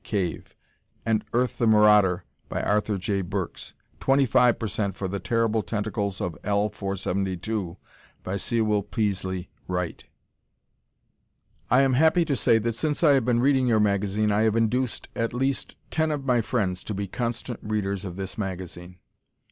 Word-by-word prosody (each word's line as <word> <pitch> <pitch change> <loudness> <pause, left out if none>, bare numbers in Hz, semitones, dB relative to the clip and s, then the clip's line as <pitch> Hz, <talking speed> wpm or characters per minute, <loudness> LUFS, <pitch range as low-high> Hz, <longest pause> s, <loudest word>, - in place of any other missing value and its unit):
Cave 90 -7 -3 0.5
and 110 -1 +1
"Earth, 125 +1 0
The 120 - +3
Marauder," 105 -4 +5 0.3
by - - -2
Arthur 105 0 +1
J. 100 +1 -1
Burks; 90 - -5 0.2
25% 120 -7 +2
for 95 - -3
"The 100 +2 -3
Terrible 115 -1 +1
Tentacles 105 -2 -3
of 85 -3 -3
L 105 +1 +1
472," 95 -1 -3 0.5
by 95 - -3
Sewell 105 0 +1
Peaslee 95 -3 -2 0.2
Wright. 90 -2 -3 1.7
I 125 +3 +5
am 135 -1 +3
happy 160 +5 +4
to 145 -3 0
say 115 - +4
that 115 +1 -1
since 150 +8 -1
I 155 - +7
have 135 -4 +3
been 120 -1 +2
reading 135 -1 +3
your 110 -3 +3
magazine, 105 +1 +1
I 105 +1 +2
have 110 -1 +2
induced 115 +2 0
at 115 +1 -1
least 135 +2 -1 0.2
ten 160 0 +1
of 145 -3 -3
my 125 -3 +3
friends 100 -6 -1
to 105 - -4
be 100 +1 -3
constant 120 +2 -3
readers 100 -2 -2
of 90 -3 -6
this 95 +2 -6
magazine. 90 -2 -6
105 Hz, 155 wpm, -25 LUFS, 95-120 Hz, 1.7 s, I